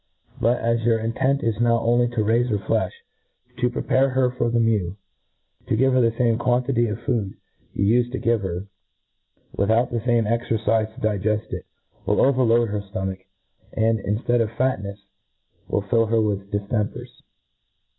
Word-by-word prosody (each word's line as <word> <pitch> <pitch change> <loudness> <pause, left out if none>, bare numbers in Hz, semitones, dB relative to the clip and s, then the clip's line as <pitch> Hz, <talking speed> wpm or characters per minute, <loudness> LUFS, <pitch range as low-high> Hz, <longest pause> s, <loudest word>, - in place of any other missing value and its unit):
But 120 +2 +2
as 115 0 +1
your 115 0 +2
intent 115 +5 0
is 115 -2 -1
now 120 -1 +3
only 120 +1 +2
to 110 - +1
raife 115 +3 +2
her 105 - +1
flefh, 100 - 0 0.7
to 125 0 +1
prepare 130 +2 +1
her 130 -1 +1
for 125 -1 -1
the 120 - 0
men^, 105 -6 +1 0.7
ta 115 - +2
give 130 +3 +3
her 130 - +4
the 115 - +4
fame 115 0 +1
quantity 120 0 +1
of 105 0 -4
food 110 -6 -1 0.4
you 100 - +1 0.2
ufed 120 - -11
to - - -1
give 115 -2 +1
her, 95 0 -4 0.9
without 110 +5 +2
the 120 - -1
fame 120 0 +2
exercifc 110 -1 0
to - - -12
digeft 105 +1 -1
it, - - -6 0.4
will - - +2
overload 120 -4 +3
her 105 0 -2
ftomach, 95 -2 -5 0.5
and, 110 0 +1
inftead 115 +4 0
of 110 - 0
Tat 130 -2 0
nefs, 100 0 -8 0.6
will 100 - -1
fill 115 +3 +2
her 115 +1 +2
with 100 -2 -1
diftempers. 105 +1 -3
115 Hz, 170 wpm, -23 LUFS, 105-120 Hz, 0.9 s, her